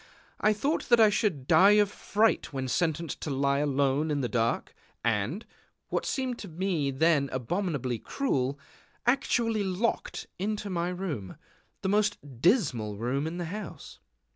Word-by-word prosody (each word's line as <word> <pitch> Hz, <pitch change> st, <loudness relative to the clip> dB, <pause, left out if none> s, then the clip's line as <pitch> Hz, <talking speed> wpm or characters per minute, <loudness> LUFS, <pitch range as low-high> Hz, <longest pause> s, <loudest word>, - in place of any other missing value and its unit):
I 215 Hz, -, +4 dB
thought 275 Hz, +10 st, -1 dB
that 240 Hz, -1 st, +6 dB
I 215 Hz, -2 st, +7 dB
should 190 Hz, -, 0 dB
die 190 Hz, +6 st, +7 dB
of 205 Hz, -1 st, +4 dB
fright 215 Hz, +2 st, +1 dB
when 135 Hz, -2 st, -3 dB
sentenced 165 Hz, +3 st, -1 dB
to -, -, -3 dB
lie 140 Hz, 0 st, +1 dB
alone 145 Hz, +1 st, +1 dB
in 145 Hz, -2 st, 0 dB
the 125 Hz, -, 0 dB
dark, 115 Hz, 0 st, -1 dB, 0.3 s
and 115 Hz, -, 0 dB, 0.4 s
what -, -, -1 dB
seemed 255 Hz, -3 st, -2 dB
to 205 Hz, -, -7 dB
me 170 Hz, -4 st, -1 dB
then 140 Hz, 0 st, +2 dB
abominably 130 Hz, -, -2 dB
cruel 140 Hz, -, -1 dB, 0.5 s
actually 235 Hz, -3 st, +2 dB
locked 195 Hz, +5 st, -1 dB
into 205 Hz, +1 st, -2 dB
my 175 Hz, 0 st, -1 dB
room, 170 Hz, -, -5 dB, 0.5 s
the 190 Hz, -, 0 dB
most 210 Hz, +1 st, +2 dB, 0.2 s
dismal 130 Hz, -, +2 dB
room 130 Hz, +7 st, -1 dB
of 165 Hz, +2 st, -4 dB
the 175 Hz, -, -3 dB
house. 200 Hz, +3 st, -7 dB
170 Hz, 150 wpm, -28 LUFS, 135-210 Hz, 0.5 s, I